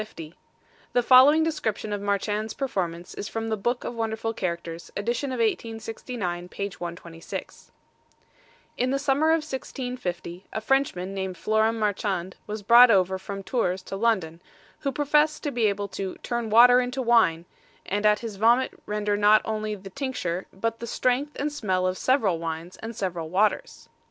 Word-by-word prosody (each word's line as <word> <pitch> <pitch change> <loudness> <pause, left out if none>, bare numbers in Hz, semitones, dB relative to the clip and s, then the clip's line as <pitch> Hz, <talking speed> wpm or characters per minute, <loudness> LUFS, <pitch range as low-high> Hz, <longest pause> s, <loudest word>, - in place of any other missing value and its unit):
The 245 - +3
following 265 +6 +7
description 220 -10 -2
of 205 - -3
Marchand's 205 +2 -1
performance 175 -10 -3
is - - -5
from 225 0 -4
The 220 - +1
Book 240 +4 -1
of - - -4
Wonderful 225 0 -2
Characters, 170 -4 -4
edition 240 +6 -1
of 255 - -3
1869, 225 -5 -3
page 200 0 -5
126: 170 -1 -8 1.1
In 250 - +1
the 275 - +1
summer 275 +3 +1
of 320 -1 +3
1650, 245 - -5
a - - -2
Frenchman 220 -7 0
named 190 -1 -3
Floram 220 +1 +2
Marchand 200 -4 -1
was 210 0 -5
brought 235 +4 +8
over 190 -2 +3
from 195 +1 -6
Tours 185 -6 -1
to 195 - -6
London, 190 -7 0 0.4
who 275 - -1
professed 295 +2 +2
to 290 - -1
be 235 -4 +2
able 200 0 -1
to 190 -1 -5
"turn 235 -2 -2
water 245 +3 +7
into 250 +2 -3
wine," 220 -9 +3 0.4
and 205 +2 -2
at 210 0 +4
his 225 -4 -6
vomit 235 +5 +3 0.2
render 210 0 0
not 210 +1 +5
only 215 -1 -2
the 195 -1 -11
tincture, 185 -8 -3
but 230 +4 -3
the 235 - -6
strength 255 +5 0
and 295 +1 -1
smell 185 -9 0
of 185 0 0
several 210 -7 +1
wines, 165 +2 -5
and 225 +1 -7
several 175 -5 -3
waters. 205 +5 0
215 Hz, 160 wpm, -26 LUFS, 190-245 Hz, 1.1 s, brought